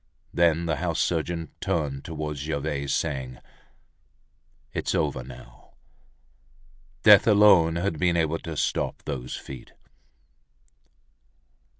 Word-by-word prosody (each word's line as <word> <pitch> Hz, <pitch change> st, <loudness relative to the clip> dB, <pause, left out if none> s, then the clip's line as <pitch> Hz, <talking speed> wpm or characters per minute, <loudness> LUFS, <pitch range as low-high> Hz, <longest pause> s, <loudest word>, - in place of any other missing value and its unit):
Then 85 Hz, -1 st, +2 dB
the 80 Hz, -2 st, -1 dB
house 85 Hz, -1 st, -2 dB
surgeon 85 Hz, -1 st, -1 dB
turned 75 Hz, -7 st, -2 dB
towards 75 Hz, -3 st, -5 dB
Gervaise, 70 Hz, -1 st, -3 dB
saying: 65 Hz, -3 st, -2 dB, 1.4 s
"It's -, -, -2 dB
over 65 Hz, -, -1 dB
now." 65 Hz, -, -14 dB, 1.3 s
Death -, -, +8 dB
alone 100 Hz, -6 st, +6 dB
had 85 Hz, -2 st, -2 dB
been 90 Hz, -1 st, +2 dB
able 80 Hz, 0 st, 0 dB
to 80 Hz, -2 st, -7 dB
stop -, -, -1 dB
those 65 Hz, -2 st, -4 dB
feet. 65 Hz, -2 st, -10 dB
80 Hz, 100 wpm, -26 LUFS, 70-85 Hz, 1.4 s, Death